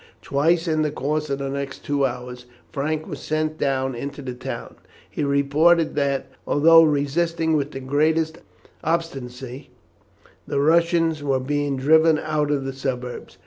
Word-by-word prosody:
Twice 165 +5 +1
in 155 -1 +1
the 155 - +1
course 150 +1 -2
of 140 - -1
the 135 0 -4
next 140 0 -5
two 140 -1 +1
hours 125 0 -8 0.2
Frank 155 +1 -2
was 145 - -7
sent 155 +1 -2
down 135 -1 0
into 140 +4 -6
the 130 -1 -5
town. 125 - -7 0.3
He - - -4
reported 145 +4 +3
that, 140 -2 0 0.2
although 165 +3 +6
resisting 160 +2 +1
with 145 -1 0
the 135 -2 -7
greatest 160 +4 +1 0.4
obstinacy, 135 -6 -4 0.8
the 140 - -1
Russians 165 +1 +2
were 135 -2 +1
being 145 +1 -1
driven 160 +3 +4
out 155 -1 -1
of 140 -2 0
the 135 - -3
suburbs. 125 -2 -5
145 Hz, 150 wpm, -23 LUFS, 135-160 Hz, 0.8 s, although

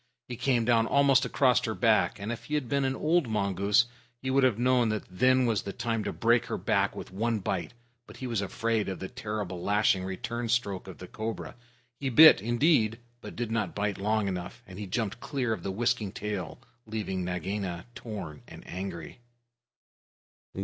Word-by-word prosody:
He 125 - -5
came 125 -1 +1
down 115 -1 +3
almost 140 -2 +4
across 130 -3 +3
her 110 - -2
back, 110 -1 +3
and 100 +3 -4
if 120 - -6
he 150 - -2
had 145 -5 -1
been 140 +3 +1
an 130 0 0
old 160 0 +2
mongoose 100 +2 +2 0.3
he 130 +1 -3
would 135 0 +3
have 125 -5 +3
known 125 -1 +3
that 110 -1 -2
then 130 +6 +3
was 115 -4 +1
the 100 - -6
time 115 0 -2
to - - -1
break 115 +1 +2
her - - -2
back - - +1
with - - -8
one 115 +4 0
bite; 95 +2 -3 0.3
but 105 - -12
he 130 - -6
was 115 -5 -1
afraid 110 +2 -1
of 95 - -4
the 95 - -5
terrible 105 -6 -5
lashing 100 -1 +2
return 115 +5 -4
stroke 100 -5 0
of 95 - -9
the 90 - -9
cobra. 110 +3 -5 0.5
He 135 - -1
bit, 155 +2 +8
indeed, 120 -1 +2 0.2
but - - -9
did 120 -2 -3
not 115 -1 -1
bite 100 -1 -1
long 105 +1 +1
enough, 90 +5 -5
and 95 +1 -11
he 105 - -5
jumped 110 +2 -2
clear 125 -5 -1
of 100 - -5
the 95 - -4
whisking 115 0 0
tail, 100 -5 -5 0.3
leaving 105 -4 -3
Nagaina 90 0 -3
torn 100 -12 -7
and - - -12
angry. 95 +6 -6
110 Hz, 190 wpm, -28 LUFS, 100-120 Hz, 0.5 s, bit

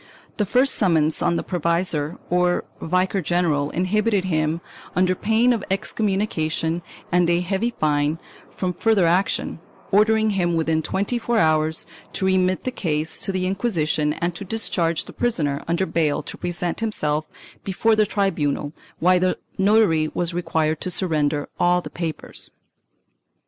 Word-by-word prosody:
The 210 - 0
first 255 +6 +3
summons 160 -6 +2
on 170 - +2
the - - -1
provisor 170 -3 -1
or 180 0 +2 0.2
vicar 185 +3 +1
general 155 -4 +1
inhibited 200 +3 +1
him, 155 -2 0 0.4
under 185 0 +3
pain 225 +6 +2
of 220 -4 -3
excommunication 190 -5 -1 0.3
and 175 -1 +3
a 175 0 +2
heavy 200 +6 -1
fine, 150 0 +1 0.3
from 180 -1 -3
further 200 0 +2
action, 175 0 +1 0.3
ordering 220 +2 +4
him, 175 -4 +1
within 160 -1 +1
twenty 200 +9 -1
four 235 0 0
hours, 155 -4 +2 0.3
to 190 - -1
remit 185 -1 +2
the 255 - -2
case 155 -8 -2
to - - -2
the 185 -1 -1
Inquisition 165 -7 0
and 170 +2 -2
to 200 - -7
discharge 175 -5 0
the - - -11
prisoner 150 -13 -1
under 170 +3 +1
bail 155 -5 0
to - - -8
present 175 -1 -3
himself 155 -9 -1 0.3
before 220 +4 +2
the 215 -1 +3
tribunal, 150 -8 -1 0.2
while 180 +2 +4
the 185 0 +1 0.2
notary 190 -6 +4
was 175 -1 -1
required 160 -3 0
to 185 - -2
surrender 150 -5 0
all 175 0 +4
the - - -8
papers. 165 -2 -5
180 Hz, 150 wpm, -22 LUFS, 160-195 Hz, 0.4 s, ordering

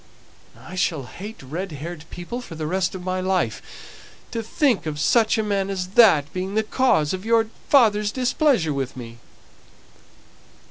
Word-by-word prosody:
I - - -12
shall 165 -5 0
hate 205 - -9
red 165 +7 -5
haired 160 +2 -7
people 205 +8 -6
for 170 - -10
the 155 -1 -4
rest 180 +3 -1
of 180 - -7
my 185 0 -2
life. 185 - 0 0.7
To 230 - -2
think 235 - +1
of 150 -1 -4
such 225 +9 +3
a 220 - +1
man 200 -2 -1
as 185 -2 -3
that 185 -9 +5
being 185 +2 -3
the 220 - +2
cause 215 - +2
of 185 0 -4
your 225 0 +2 0.2
father's 210 -6 +4
displeasure 250 - +1
with 135 -2 -4
me!" 120 -1 -9
185 Hz, 165 wpm, -23 LUFS, 160-220 Hz, 0.7 s, that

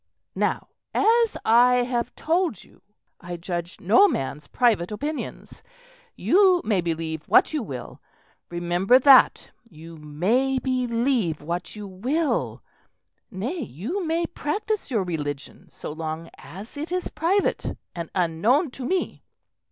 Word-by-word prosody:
"Now, - - -1 0.3
as 460 +1 +3
I 245 +2 +5
have 240 -1 -2
told 335 - 0
you, - - -23 0.4
I 175 0 -7
judge 175 0 -5
no 230 - +5
man's 145 - -3
private 215 -7 +1
opinions. 290 +8 -6 0.5
You 375 -2 +4
may 205 -4 +2
believe 160 -2 -4
what - - +5
you 305 - 0
will. 130 - -8 0.5
Remember 175 +6 +3
that. 265 0 +6 0.2
You 165 0 -12
may 195 - 0
believe 245 - 0
what 170 +5 -4
you 210 -1 -7
will; 255 - -1 0.7
nay, 235 - -4
you 250 - -4
may 335 +1 0
practise 410 +7 -3
your 220 -7 0
religion 145 -5 -5
so - - -8
long 160 +1 -5
as 200 - -11
it 310 +4 -5
is 365 0 -2
private 365 +6 0 0.2
and 170 -2 -6
unknown 200 - +2
to 255 0 -7
me." 370 +2 -2
230 Hz, 130 wpm, -24 LUFS, -, 0.7 s, that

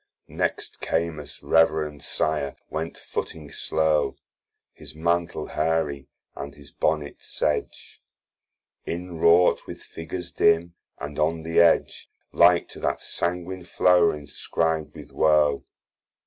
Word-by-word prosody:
Next - - -3
Camus, 80 -4 -3
reverend 80 -2 +2
Sire, 75 -2 -1 0.2
went 80 +1 -4
footing 75 -3 -6
slow, 80 -2 +1 0.6
His - - -10
Mantle 85 +2 0
hairy, 75 -4 -1 0.3
and 70 0 -7
his 70 -1 -14
Bonnet 75 -2 -1
sedge, 75 - -3 0.9
Inwrought 85 0 +3
with - - -9
figures 85 +1 -7
dim, 85 0 +3 0.2
and 75 +1 -6
on 80 +1 +1
the 80 +1 +1
edge 85 -1 +3 0.2
Like 85 0 +5
to - - -10
that - - -1
sanguine 90 +1 -3
flower 90 -2 +4
inscrib'd 75 +2 -2
with 75 -3 -11
woe. 75 -2 +3
80 Hz, 110 wpm, -25 LUFS, 75-85 Hz, 0.9 s, Like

